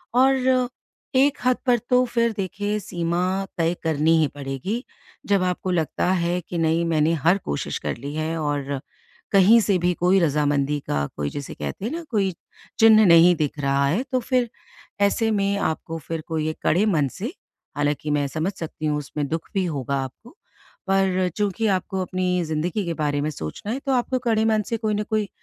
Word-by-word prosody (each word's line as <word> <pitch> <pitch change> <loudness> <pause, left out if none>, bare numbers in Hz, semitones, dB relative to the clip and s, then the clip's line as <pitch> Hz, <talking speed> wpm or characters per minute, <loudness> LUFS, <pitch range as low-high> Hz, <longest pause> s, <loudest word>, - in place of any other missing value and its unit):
और 260 -1 +3 0.5
एक 280 +2 +4
हद 255 0 +3
पर 245 -2 +4
तो 250 0 +5
फिर 235 -1 +1
देखिए, 205 +2 -2
सीमा 180 0 -1
तय 165 0 +2
करनी 160 0 +2
ही 155 - +3
पड़ेगी। 145 - -4 0.4
जब 200 -2 +3
आपको 180 0 -1
लगता 165 -2 0
है 175 -1 +1
कि 175 +1 -6
नहीं, 165 +1 +2
मैंने 160 -1 +2
हर 175 +4 +5
कोशिश 70 - -2
कर - - -3
ली 140 +4 -6
है 160 +1 -2
और 145 -2 -2 0.5
कहीं 200 +3 +7
से 200 -2 +2
भी 175 +1 +1
कोई 180 +3 +3
रज़ामंदी 145 -2 +1
का 70 -1 0
कोई, 75 -1 -1
जिसे 145 -2 -6
कहते 75 - -5
हैं 230 - -2
ना, 335 +1 -4
कोई 195 -4 +1 0.5
चिन्ह 220 -1 +7
नहीं 170 0 +7
दिख 150 -2 -2
रहा 140 0 +2
है, 180 - +1
तो 265 -1 -1
फिर 250 -1 0 0.5
ऐसे 225 +3 +2
में 200 -1 +1
आपको 165 -3 -2
फिर 165 -1 -3
कोई 155 -1 -1
एक 155 - -5
कड़े 185 +7 +3
मन 155 -9 +2
से 230 - -4 0.4
हालाँकि 145 +1 -1
मैं 145 -1 +1
समझ 160 +7 -2
सकती 160 -3 -6
हूँ, 150 -1 +1
उसमें 145 0 -4
दुख 165 +2 -4
भी 190 -1 +1
होगा 140 -5 -2
आपको। 225 - -11 0.5
पर 190 -1 +2
चूँकि 210 +2 0
आपको 190 +1 -4
अपनी 180 -1 -1
ज़िंदगी 160 +6 -1
के 170 - -2
बारे 145 -2 0
में 150 - -1
सोचना 105 - -6
है, 255 - -2
तो 275 0 -3
आपको 255 +1 0
कड़े 225 -3 +1
मन 220 -1 +3
से 230 - 0
कोई 215 -1 -1
न 210 - -1
कोई 215 -1 -1
180 Hz, 190 wpm, -23 LUFS, 155-215 Hz, 0.5 s, कहीं